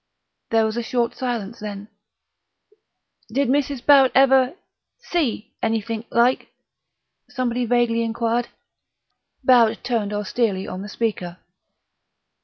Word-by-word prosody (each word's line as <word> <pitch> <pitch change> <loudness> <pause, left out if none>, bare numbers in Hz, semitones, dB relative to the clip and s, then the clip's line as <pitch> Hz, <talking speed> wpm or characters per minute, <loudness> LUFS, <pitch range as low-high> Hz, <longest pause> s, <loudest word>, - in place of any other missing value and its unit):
There 225 -1 +3
was 220 +1 -2
a - - 0
short 235 0 -1
silence: 235 -4 -4
then, 205 -1 -7 1.4
"Did 270 +2 0
Mrs. 275 -2 0
Barrett 275 -3 +6
ever..._ 265 +1 +4 0.6
see_ 275 -10 0 0.2
anythink, 225 0 -2
like?" 240 +2 +2 0.8
somebody 245 -1 -2
vaguely 240 -1 +2
inquired. 230 +1 -1 1.0
Barrett 240 -3 +4
turned 225 -5 -1
austerely 205 -1 -1
on 185 - -6
the 205 - -7
speaker. 200 -6 -3
235 Hz, 105 wpm, -22 LUFS, 220-255 Hz, 1.4 s, Barrett